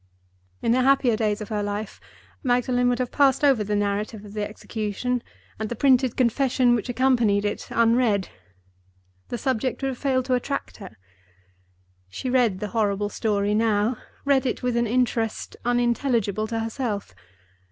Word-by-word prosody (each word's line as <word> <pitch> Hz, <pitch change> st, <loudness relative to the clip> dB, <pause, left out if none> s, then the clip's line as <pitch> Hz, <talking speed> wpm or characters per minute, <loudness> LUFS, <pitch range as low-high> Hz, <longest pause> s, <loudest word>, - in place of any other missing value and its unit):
In 230 Hz, -, +2 dB
the 255 Hz, +2 st, +3 dB
happier 260 Hz, -3 st, +3 dB
days 215 Hz, -1 st, -1 dB
of 210 Hz, -, -6 dB
her 210 Hz, -2 st, -1 dB
life, 205 Hz, +1 st, -4 dB, 0.4 s
Magdalen 245 Hz, -1 st, +2 dB
would 245 Hz, -, +1 dB
have 250 Hz, -1 st, -2 dB
passed 275 Hz, 0 st, +3 dB
over 270 Hz, -7 st, +4 dB
the 210 Hz, 0 st, -1 dB
narrative 205 Hz, +1 st, -2 dB
of 205 Hz, -, -11 dB
the 210 Hz, -1 st, -2 dB
execution, 220 Hz, +3 st, -3 dB, 0.4 s
and 220 Hz, -1 st, -3 dB
the 240 Hz, -, -3 dB
printed 260 Hz, -1 st, +3 dB
confession 250 Hz, 0 st, +3 dB
which 235 Hz, 0 st, -1 dB
accompanied 235 Hz, -5 st, +2 dB
it 205 Hz, -, -3 dB
unread; 230 Hz, -4 st, +2 dB, 1.0 s
the 240 Hz, -, -4 dB
subject 255 Hz, +2 st, -1 dB
would 270 Hz, -, +1 dB
have 260 Hz, -, -5 dB
failed 260 Hz, -2 st, +1 dB
to 255 Hz, -, 0 dB
attract 265 Hz, +3 st, -2 dB
her. 190 Hz, -, -11 dB, 1.1 s
She 250 Hz, -, -4 dB
read 240 Hz, -7 st, +2 dB
the 210 Hz, -, -3 dB
horrible 205 Hz, -2 st, 0 dB
story 205 Hz, -1 st, 0 dB
now—read 230 Hz, +5 st, 0 dB
it 245 Hz, -, -3 dB
with 250 Hz, -1 st, 0 dB
an 235 Hz, 0 st, +1 dB
interest 230 Hz, -1 st, -1 dB
unintelligible 235 Hz, -3 st, +1 dB
to 225 Hz, 0 st, -2 dB
herself. 225 Hz, -, -3 dB
235 Hz, 155 wpm, -24 LUFS, 210-255 Hz, 1.1 s, over